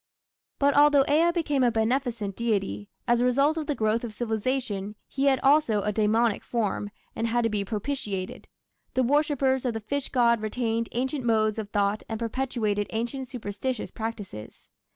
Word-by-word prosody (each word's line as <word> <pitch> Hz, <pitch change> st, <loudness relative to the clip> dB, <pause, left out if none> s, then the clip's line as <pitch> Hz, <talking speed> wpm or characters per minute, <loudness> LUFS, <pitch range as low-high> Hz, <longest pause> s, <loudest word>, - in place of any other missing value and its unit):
But 280 Hz, 0 st, +3 dB
although 290 Hz, -1 st, +6 dB
Ea 320 Hz, +4 st, +4 dB
became 300 Hz, -6 st, 0 dB
a 245 Hz, -, +5 dB
beneficent 230 Hz, -2 st, -1 dB
deity, 195 Hz, -, -1 dB, 0.2 s
as 240 Hz, 0 st, +3 dB
a -, -, +3 dB
result 275 Hz, +5 st, +3 dB
of 315 Hz, -3 st, -3 dB
the 295 Hz, -, 0 dB
growth 220 Hz, +1 st, +1 dB
of 225 Hz, -3 st, -6 dB
civilization, 220 Hz, -3 st, -2 dB
he 275 Hz, 0 st, -1 dB
had 270 Hz, -2 st, +4 dB
also 270 Hz, -8 st, +3 dB
a 210 Hz, -, 0 dB
demoniac 220 Hz, +1 st, +2 dB
form, 210 Hz, -3 st, -2 dB, 0.3 s
and 230 Hz, -, -1 dB
had 240 Hz, +1 st, +1 dB
to 230 Hz, -, +2 dB
be 205 Hz, -1 st, 0 dB
propitiated. 205 Hz, -3 st, -4 dB, 0.5 s
The 260 Hz, -, +3 dB
worshippers 275 Hz, -1 st, +2 dB
of 245 Hz, -3 st, -1 dB
the -, -, -1 dB
fish 275 Hz, +6 st, -3 dB
god 235 Hz, -3 st, +3 dB
retained 230 Hz, +1 st, -1 dB
ancient 260 Hz, +3 st, -1 dB
modes 220 Hz, -2 st, +2 dB
of 210 Hz, -2 st, -5 dB
thought 205 Hz, 0 st, +1 dB
and 225 Hz, -, -2 dB
perpetuated 230 Hz, -4 st, -1 dB
ancient 240 Hz, +4 st, -3 dB
superstitious 240 Hz, 0 st, -4 dB
practices. 210 Hz, -, -7 dB
235 Hz, 170 wpm, -26 LUFS, 215-265 Hz, 0.5 s, although